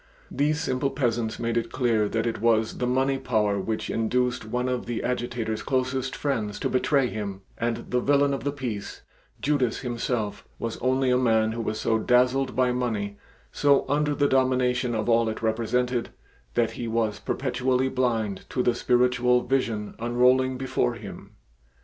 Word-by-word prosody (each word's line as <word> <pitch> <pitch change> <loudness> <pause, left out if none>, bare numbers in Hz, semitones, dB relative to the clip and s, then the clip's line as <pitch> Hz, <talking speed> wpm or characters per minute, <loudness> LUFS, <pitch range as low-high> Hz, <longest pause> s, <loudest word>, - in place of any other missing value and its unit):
These 150 +3 +1
simple 135 -3 0
peasants 120 -5 -1
made 115 0 -1
it 115 - -2
clear 115 -5 +1
that 115 +1 -1
it 115 -3 -2
was 115 -1 +2
the 125 - 0
money 135 +2 +1
power 105 -6 +1
which 110 +3 -3
induced 125 +1 0
one 125 +3 -1
of 125 -2 -2
the 120 -2 -3
Agitator's 120 -3 -2
closest 130 0 -1
friends 110 -8 -2
to - - 0
betray 135 +1 +2
him, 100 -3 -4
and 115 0 -3
the 125 - +2
villain 140 +1 +3
of 135 - -3
the 145 - 0
piece, 120 -8 -5 0.4
Judas 140 -5 +1
himself, 120 -3 -2
was 115 -1 -4
only 130 +1 +1
a 125 - +3
man 110 -3 +3
who 115 +1 -3
was 110 -1 -3
so 110 0 +1
dazzled 125 +3 +2
by 125 -1 +3
money, 110 -5 -2 0.3
so 140 -1 +3
under 150 0 +1
the 145 0 +2
domination 130 -2 +2
of 110 0 -2
all 115 -1 +3
it 110 - -5
represented, 120 +2 0 0.5
that 115 -1 +2
he 120 - -5
was 110 -2 0
perpetually 130 0 0
blind 115 -7 -1
to 125 - 0
the 120 - +3
spiritual 125 +1 +2
vision 115 -5 -1
unrolling 125 +2 +3
before 125 - 0
him. - - -10
125 Hz, 170 wpm, -26 LUFS, 115-130 Hz, 0.5 s, villain